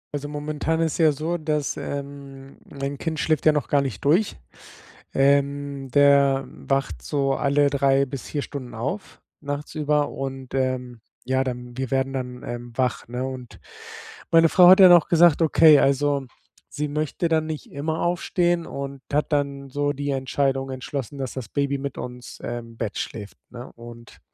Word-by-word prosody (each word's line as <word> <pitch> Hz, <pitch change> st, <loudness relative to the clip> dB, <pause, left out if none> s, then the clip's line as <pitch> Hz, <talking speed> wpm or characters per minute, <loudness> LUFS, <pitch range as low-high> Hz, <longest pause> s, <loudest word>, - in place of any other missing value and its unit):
Also, 145 Hz, 0 st, -4 dB
momentan 150 Hz, +2 st, -2 dB
ist 165 Hz, 0 st, -1 dB
ja 160 Hz, -2 st, +5 dB
so, 160 Hz, +4 st, -3 dB
dass, 150 Hz, -2 st, -1 dB
ähm, 140 Hz, -1 st, -7 dB
mein 140 Hz, 0 st, -5 dB
Kind 160 Hz, -2 st, -3 dB
schläft 155 Hz, +2 st, +1 dB
ja -, -, +8 dB
noch 150 Hz, -3 st, -1 dB
gar 140 Hz, -1 st, +3 dB
nicht 135 Hz, -1 st, -5 dB
durch. 180 Hz, +9 st, +3 dB, 0.8 s
Ähm, 140 Hz, 0 st, +1 dB
der 140 Hz, -1 st, +4 dB
wacht 130 Hz, -, -3 dB
so 135 Hz, -, 0 dB
alle 140 Hz, +1 st, +2 dB
3 140 Hz, 0 st, +3 dB
bis 135 Hz, -1 st, -7 dB
4 145 Hz, -2 st, -3 dB
Stunden 130 Hz, -5 st, -8 dB
auf, 135 Hz, -, -5 dB, 0.2 s
nachtsüber 150 Hz, 0 st, -1 dB
und, 135 Hz, -1 st, -6 dB
ähm, 125 Hz, -3 st, -2 dB, 0.2 s
ja, 130 Hz, +1 st, +1 dB
dann 125 Hz, -1 st, -6 dB
wir 130 Hz, -2 st, -3 dB
werden 135 Hz, 0 st, 0 dB
dann, 125 Hz, -1 st, -5 dB
ähm, 120 Hz, 0 st, -7 dB
wach, 125 Hz, -2 st, -1 dB
ne, 125 Hz, +2 st, -3 dB
und 130 Hz, -2 st, -8 dB, 0.7 s
meine 165 Hz, -1 st, +6 dB
Frau 180 Hz, -1 st, +7 dB
hat 185 Hz, -, +8 dB
dann 185 Hz, -, +10 dB
auch 170 Hz, -3 st, +5 dB
gesagt: 170 Hz, -1 st, +5 dB
„Okay, 155 Hz, -1 st, +6 dB
also, 140 Hz, 0 st, +1 dB, 0.4 s
sie 150 Hz, 0 st, -3 dB
möchte 155 Hz, +3 st, -2 dB
dann 160 Hz, -1 st, +1 dB
nicht 155 Hz, -2 st, -6 dB
immer 155 Hz, +3 st, -3 dB
aufstehen“ 175 Hz, -1 st, 0 dB
und 140 Hz, 0 st, -6 dB
hat 150 Hz, +1 st, 0 dB
dann 140 Hz, -1 st, -1 dB
so 145 Hz, +1 st, -1 dB
die 145 Hz, +1 st, -3 dB
Entscheidung 135 Hz, 0 st, -1 dB
entschlossen, 130 Hz, 0 st, -5 dB
dass 130 Hz, -2 st, -4 dB
das 125 Hz, -6 st, -7 dB
Baby 140 Hz, -1 st, -1 dB
mit 140 Hz, 0 st, -5 dB
uns, 125 Hz, 0 st, -8 dB
ähm, 120 Hz, -1 st, -5 dB
im 115 Hz, -, -17 dB
Bett 110 Hz, -3 st, -4 dB
schläft, 105 Hz, -3 st, -6 dB
ne? 125 Hz, 0 st, -9 dB
Und 115 Hz, 0 st, -13 dB
140 Hz, 170 wpm, -23 LUFS, 130-150 Hz, 0.8 s, dann